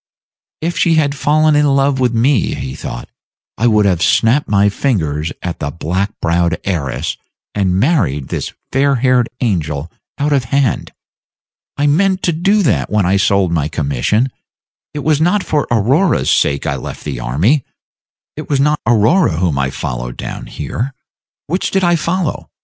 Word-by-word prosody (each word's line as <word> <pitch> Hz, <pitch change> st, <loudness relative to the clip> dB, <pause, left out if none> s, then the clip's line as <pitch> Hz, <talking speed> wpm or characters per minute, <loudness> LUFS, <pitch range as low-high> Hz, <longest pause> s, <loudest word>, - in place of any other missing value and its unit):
"If 170 Hz, +2 st, -2 dB
she 165 Hz, -2 st, +3 dB
had 145 Hz, -3 st, +2 dB
fallen 155 Hz, +2 st, +2 dB
in 150 Hz, 0 st, +3 dB
love 135 Hz, -1 st, +2 dB
with 125 Hz, -2 st, +2 dB
me," 120 Hz, 0 st, +1 dB
he 65 Hz, -1 st, -5 dB
thought, -, -, -7 dB, 0.5 s
"I 120 Hz, -, +1 dB
would 105 Hz, -2 st, +3 dB
have 90 Hz, -4 st, +1 dB
snapped 120 Hz, -, +3 dB
my 100 Hz, 0 st, +3 dB
fingers 80 Hz, -, -1 dB
at 90 Hz, -2 st, -4 dB
the 70 Hz, -, -2 dB
black 90 Hz, +6 st, -2 dB
browed 85 Hz, 0 st, +1 dB
heiress, 80 Hz, -9 st, -2 dB, 0.4 s
and 95 Hz, -2 st, +1 dB
married 100 Hz, -, +1 dB
this -, -, -3 dB, 0.2 s
fair 140 Hz, +1 st, +2 dB
haired 125 Hz, -1 st, +2 dB
angel 80 Hz, -, -1 dB, 0.3 s
out 145 Hz, +1 st, 0 dB
of 135 Hz, -4 st, +1 dB
hand. 135 Hz, 0 st, 0 dB, 0.9 s
I 145 Hz, -, +1 dB
meant 185 Hz, +6 st, +2 dB
to 175 Hz, -, +2 dB
do 195 Hz, +6 st, +2 dB
that 80 Hz, -, +1 dB
when 105 Hz, -2 st, +1 dB
I 95 Hz, +2 st, +2 dB
sold 100 Hz, -2 st, +2 dB
my 80 Hz, -3 st, 0 dB
commission. 80 Hz, -, 0 dB, 0.6 s
It 145 Hz, -, -4 dB
was 155 Hz, -1 st, +2 dB
not 185 Hz, +4 st, +2 dB
for 150 Hz, -1 st, -1 dB
Aurora's 130 Hz, -, +2 dB
sake 70 Hz, -1 st, +1 dB
I -, -, -1 dB
left -, -, -8 dB
the -, -, -4 dB
army, 80 Hz, -, +1 dB, 0.7 s
it 155 Hz, -, -8 dB
was 140 Hz, -2 st, +1 dB
not 150 Hz, +2 st, +2 dB
Aurora 120 Hz, -, +3 dB
whom 85 Hz, -5 st, 0 dB
I 65 Hz, 0 st, 0 dB
followed -, -, -5 dB
down -, -, -6 dB
here. 130 Hz, +3 st, -4 dB, 0.5 s
Which 180 Hz, +5 st, -1 dB
did 195 Hz, -1 st, 0 dB
I 175 Hz, -1 st, +4 dB
follow? 170 Hz, +1 st, -2 dB
120 Hz, 165 wpm, -16 LUFS, -, 0.9 s, I